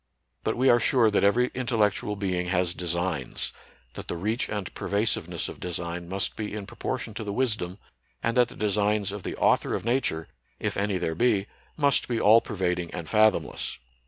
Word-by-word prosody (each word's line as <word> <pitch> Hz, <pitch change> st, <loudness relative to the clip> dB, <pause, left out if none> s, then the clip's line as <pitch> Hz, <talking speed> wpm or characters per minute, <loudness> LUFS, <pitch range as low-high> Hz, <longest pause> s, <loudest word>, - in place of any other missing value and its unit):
But -, -, -1 dB
we 130 Hz, +2 st, +3 dB
are 120 Hz, -2 st, +6 dB
sure 115 Hz, -3 st, +4 dB
that 100 Hz, -, +2 dB
every 120 Hz, +5 st, +3 dB
intellectual 110 Hz, -5 st, 0 dB
being 90 Hz, -3 st, -1 dB
has 90 Hz, -1 st, +1 dB
designs, 85 Hz, -5 st, -2 dB, 0.4 s
that -, -, -8 dB
the -, -, -3 dB
reach 110 Hz, +8 st, -1 dB
and 105 Hz, -4 st, -4 dB
pervasiveness 105 Hz, +1 st, 0 dB
of -, -, -8 dB
design 85 Hz, 0 st, -4 dB
must 95 Hz, +1 st, 0 dB
be 105 Hz, -1 st, -4 dB
in 105 Hz, -2 st, -5 dB
proportion 120 Hz, +1 st, -4 dB
to 105 Hz, -, -5 dB
the 105 Hz, -, -4 dB
wisdom; 105 Hz, -6 st, 0 dB, 0.5 s
and 115 Hz, -, 0 dB
that 125 Hz, -1 st, +5 dB
the -, -, -12 dB
designs 105 Hz, -1 st, +1 dB
of 105 Hz, 0 st, -6 dB
the -, -, -4 dB
Author' -, -, +2 dB
of -, -, -4 dB
Nature, 115 Hz, -, 0 dB, 0.3 s
if -, -, -2 dB
any 100 Hz, -1 st, 0 dB
there 80 Hz, -2 st, -1 dB
be, 100 Hz, +1 st, +2 dB, 0.3 s
must 140 Hz, -3 st, +3 dB
be 120 Hz, -2 st, -1 dB
all 110 Hz, +2 st, +7 dB
pervading 90 Hz, -4 st, -2 dB
and 85 Hz, -3 st, -5 dB
fathomless. 110 Hz, -1 st, +2 dB
105 Hz, 185 wpm, -27 LUFS, 90-115 Hz, 0.5 s, all